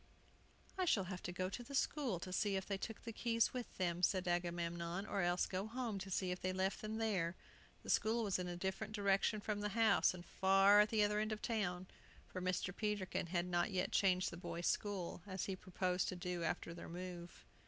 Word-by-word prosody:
"I 370 - +3
shall 220 - +3
have 185 -1 -5
to - - -4
go 185 +1 -1
to 200 +6 -5
the 280 +3 -7
school 265 - +1
to 185 - -5
see 200 +1 +1
if 190 0 -1
they 195 -1 -2
took 225 +2 -6
the 230 - -5
keys 230 0 +2
with 250 -2 -5
them," 175 -1 0
said 185 0 +2
Agamemnon; 175 +1 -1
"or 200 - -1
else 175 +1 +2
go 190 +2 -3
home 230 -3 -3
to 190 +1 -6
see 185 0 0
if 180 - -4
they 185 - 0
left 190 +1 0
them 215 0 -3
there." 190 -6 0 0.5
The - - -9
school 225 +2 +2
was 195 -3 0
in 180 - -2
a 175 0 -4
different 190 +4 -3
direction 200 +1 +2
from 210 0 -2
the 210 0 -1
house, 220 -3 +4
and 175 -1 -9
far 195 +3 +5
at 210 +1 +6
the 215 -2 +3
other 210 0 +2
end 215 +1 0
of 215 - -4
the - - 0
town; 185 -5 -1 0.4
for 185 - -6
Mr. 185 0 -1
Peterkin 210 -5 -1
had 175 0 0
not 175 +1 +1
yet 185 -2 0
changed 185 -2 +3
the 170 - -7
boys' 175 0 -4
school, 195 -4 -1
as 190 -2 -3
he 195 - -2
proposed 180 0 -1
to - - -2
do 180 0 -3
after 165 - -2
their 170 - -8
move. 175 0 -7
190 Hz, 225 wpm, -39 LUFS, 180-210 Hz, 0.5 s, at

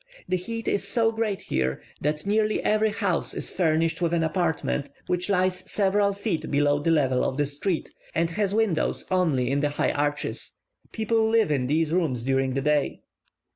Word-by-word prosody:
The - - +1
heat 225 +5 -5
is 200 0 0
so 225 +2 +2
great 220 -3 -2
here, 65 0 -1 0.2
that 150 +2 -1
nearly 215 +1 +2
every 215 +1 +3
house 200 -5 -1
is - - -5
furnished 165 -1 +1
with 170 0 +1
an 165 - +1
apartment, 160 -4 -1 0.2
which 180 +1 -1
lies 185 -1 +1
several 200 0 +2
feet 195 -6 -3
below 145 0 +2
the 150 - 0
level 135 -6 +2
of 130 - -1
the 145 - +2
street, 150 +5 -3 0.2
and 165 +1 +1
has 200 +2 0
windows 210 -6 0
only 150 -9 +2
in 140 - +1
the 145 0 +1
high 145 - 0
arches. 145 0 -2 0.4
People 220 0 +1
live 220 -6 +3
in 130 -4 +1
these 155 +2 +1
rooms 155 -9 0
during 135 0 +1
the 135 - 0
day. 150 0 0
165 Hz, 180 wpm, -25 LUFS, 145-200 Hz, 0.4 s, every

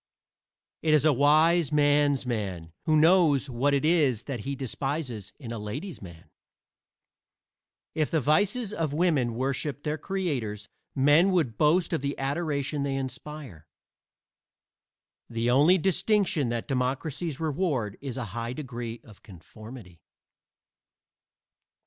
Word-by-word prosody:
It 155 -1 +3
is 150 - +3
a 155 - +5
wise 155 +4 +4
"man's 145 -2 +3
man" 95 -9 -4
who 155 -1 +3
knows 155 -4 +4
what 130 +4 +1
it 140 - 0
is 150 -9 +2
that 135 -4 -5
he 140 +6 -4
despises 135 - -4
in 120 -5 -7
a 115 - -5
"ladies' 140 - -6
man." 85 -4 -13 1.6
If 155 -2 0
the 160 - +1
vices 205 - +1
of 160 -6 -2
women 150 -8 +1
worshiped 135 +3 -2
their 150 +1 -2
creators 130 - -3 0.3
men 145 +7 +5
would 150 -11 +1
boast 165 +6 +2
of 160 - 0
the 140 0 -3
adoration 145 0 -2
they 140 -1 -1
inspire. 135 - -7 1.6
The 115 +1 0
only 150 +9 +5
distinction 190 - +1
that 120 -1 -3
democracies 135 +4 -2
reward 150 - -1
is 135 -2 -5
a 125 - -3
high 115 +1 -4
degree 120 -4 -6
of 105 -3 -17
conformity. 100 - -13
140 Hz, 125 wpm, -27 LUFS, 120-155 Hz, 1.6 s, a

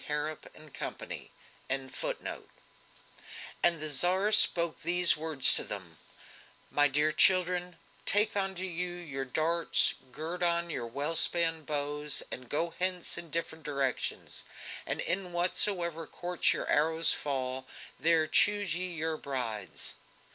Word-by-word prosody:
Harrap 150 +1 -4
and 155 -2 -16
Company.)] - - -7 0.4
And 135 -1 -3
the 160 -3 -6
Tsar 185 +8 +2
spoke 170 -5 +5
these 175 0 +3
words 155 -4 +7
to - - +1
them: 95 -6 -9 0.7
"My 145 0 +4
dear 150 +2 +2
children, 180 0 +3 0.3
take 210 +1 +3
unto 190 -2 -3
you 180 -1 -3
your 145 -6 -6
darts, 165 +6 +1 0.2
gird 160 +6 -6
on 170 -1 0
your 120 -6 -4
well 145 +7 -3
spanned 165 -2 +2
bows, 145 0 -1
and 125 -1 -6
go 165 +3 -2
hence 180 -1 0
in 170 -1 -7
different 160 0 -4
directions, 140 -4 -3 0.4
and - - -2
in 180 -1 -2
whatsoever 175 -2 +3
courts 175 0 0
your - - -3
arrows 160 +2 +3
fall, 130 -2 -4 0.3
there 165 -1 +2
choose 205 +1 +2
ye 180 +2 -2
your 160 -1 -3
brides!" 125 -7 -5
160 Hz, 125 wpm, -29 LUFS, 145-175 Hz, 0.7 s, words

